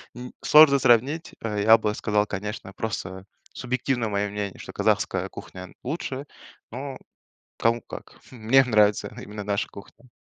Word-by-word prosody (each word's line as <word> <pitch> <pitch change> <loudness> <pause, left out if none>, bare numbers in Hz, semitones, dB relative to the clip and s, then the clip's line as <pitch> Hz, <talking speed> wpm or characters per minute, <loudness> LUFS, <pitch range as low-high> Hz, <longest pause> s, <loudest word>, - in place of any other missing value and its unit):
н 125 +1 -8
сложно 150 -2 +7
сравнить, 135 +7 +2
э, 105 -2 -2
я 110 +2 +7
бы 105 -1 -1
сказал, 105 -1 0
конечно, 105 0 -6
просто 95 -4 -5 0.3
субъективно 125 -2 -2
мое 100 0 -1
мнение- 100 -1 -5
что - - -9
казахская - - 0
кухня 95 0 -10
лучше, 135 -1 -4 0.5
но 130 +2 -6 0.6
кому 115 +1 +2
как. - - -11
Мне 125 +2 +4
нравится 105 -4 +2
именно 105 0 -7
наша 100 0 -1
кухня. 100 +5 -15
110 Hz, 140 wpm, -25 LUFS, 105-130 Hz, 0.6 s, сложно